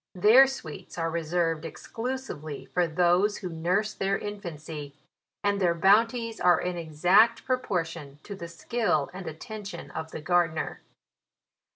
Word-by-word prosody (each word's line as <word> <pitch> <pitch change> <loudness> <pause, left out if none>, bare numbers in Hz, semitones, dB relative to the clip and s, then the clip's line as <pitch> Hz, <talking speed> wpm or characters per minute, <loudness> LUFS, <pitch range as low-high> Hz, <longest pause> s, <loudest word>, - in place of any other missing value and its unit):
Their 220 +9 +7
sweets 180 - -8
are 165 -1 -1
re 170 0 -2
served 165 -1 0
exclusively 195 - -5
for 180 -1 +2
those 180 +5 +2
who 185 - -5
nurse 180 +6 0
their 195 0 0
infancy; 160 -8 -7 0.5
and 200 -1 +1
their 175 -2 +3
bounties 225 +5 +3
are 175 -2 +5
in 180 0 -2
exact 175 +8 +3
pro 255 -1 +1
portion 165 - -4
to 205 - -7
the 190 -4 -7
skill 170 -4 -1
and 185 -1 -7
attention 200 +3 -7
of 160 0 -5
the - - -7
gar 175 +2 +2
dener. 155 0 -4
175 Hz, 150 wpm, -27 LUFS, 160-210 Hz, 0.5 s, Their